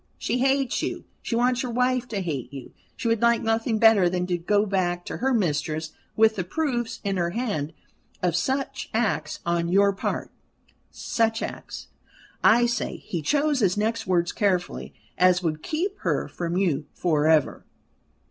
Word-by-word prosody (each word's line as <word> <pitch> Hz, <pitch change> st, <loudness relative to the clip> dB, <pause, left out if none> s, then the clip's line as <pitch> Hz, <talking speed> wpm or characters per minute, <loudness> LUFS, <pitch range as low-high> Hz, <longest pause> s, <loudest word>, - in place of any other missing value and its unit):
She 245 Hz, -, -1 dB
hates 270 Hz, 0 st, +1 dB
you; -, -, -4 dB, 0.2 s
she 230 Hz, -, -3 dB
wants 245 Hz, +1 st, +2 dB
your 250 Hz, -, -3 dB
wife 250 Hz, +1 st, +1 dB
to 205 Hz, -4 st, -3 dB
hate 145 Hz, -9 st, -4 dB
you. 135 Hz, -3 st, -9 dB, 0.2 s
She -, -, -3 dB
would 230 Hz, -2 st, +1 dB
like 235 Hz, 0 st, +3 dB
nothing 225 Hz, 0 st, +1 dB
better 215 Hz, -5 st, +5 dB
than 180 Hz, 0 st, -1 dB
to 180 Hz, -1 st, -1 dB
go 205 Hz, +5 st, +2 dB
back 175 Hz, -3 st, -1 dB
to -, -, -5 dB
her 265 Hz, +2 st, 0 dB
mistress 160 Hz, -, -1 dB, 0.2 s
with 220 Hz, 0 st, +4 dB
the 185 Hz, -, 0 dB
proofs 240 Hz, -, -2 dB
in 195 Hz, -2 st, -1 dB
her 170 Hz, -1 st, 0 dB
hand 175 Hz, -, -2 dB, 0.5 s
of 175 Hz, -2 st, +2 dB
such 265 Hz, +10 st, -2 dB
acts 225 Hz, -1 st, -1 dB
on 170 Hz, 0 st, 0 dB
your 200 Hz, +2 st, +4 dB
part 195 Hz, -, -3 dB, 0.6 s
such 225 Hz, -1 st, -1 dB
acts, -, -, -7 dB, 0.5 s
I 240 Hz, +2 st, +6 dB
say," 240 Hz, 0 st, -2 dB
he 170 Hz, -, -5 dB
chose 290 Hz, -, +1 dB
his 195 Hz, -4 st, +2 dB
next 225 Hz, +1 st, -1 dB
words 175 Hz, -2 st, +2 dB
carefully, 185 Hz, -4 st, -1 dB, 0.3 s
"as 180 Hz, 0 st, +4 dB
would 155 Hz, -2 st, -1 dB
keep 380 Hz, -, -2 dB
her -, -, -1 dB
from 170 Hz, 0 st, -3 dB
you 160 Hz, -7 st, 0 dB
for 155 Hz, -4 st, +1 dB
ever." 155 Hz, -3 st, +2 dB
200 Hz, 170 wpm, -25 LUFS, 175-240 Hz, 0.6 s, I